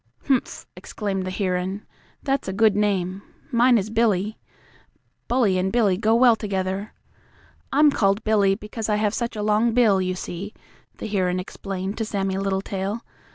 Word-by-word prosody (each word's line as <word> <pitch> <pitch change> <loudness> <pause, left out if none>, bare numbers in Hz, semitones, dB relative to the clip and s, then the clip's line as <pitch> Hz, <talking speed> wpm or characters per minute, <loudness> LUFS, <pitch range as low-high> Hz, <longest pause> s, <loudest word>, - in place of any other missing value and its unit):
"Humph!" 265 -3 0
exclaimed 195 -3 -4
the - - -1
heron. 185 +1 -2 0.4
"That's 275 -1 -1
a 190 - -2
good 215 0 +3
name. 195 -2 0 0.3
Mine 240 +1 +5
is 210 +1 -2
Billy. 215 -2 +1 0.9
Bully 225 -7 +2
and 190 +1 0
Billy 220 -6 +3
go 220 +3 +2
well 240 -1 +6
together. 195 -1 -3 0.8
I'm 295 +2 +5
called 200 -3 +1
Billy 205 -3 +3
because 215 +1 -6
I 210 - +3
have 210 0 0
such 235 -1 -3
a 210 - -3
long 215 +2 +2
bill, 215 -6 +4
you 185 0 -1
see," 185 +3 -6 0.4
the - - -6
heron 185 -3 0
explained 190 +2 -5
to 225 - 0
Sammie 195 -2 -2
Littletail. 195 +2 -2
205 Hz, 155 wpm, -23 LUFS, 190-225 Hz, 0.9 s, well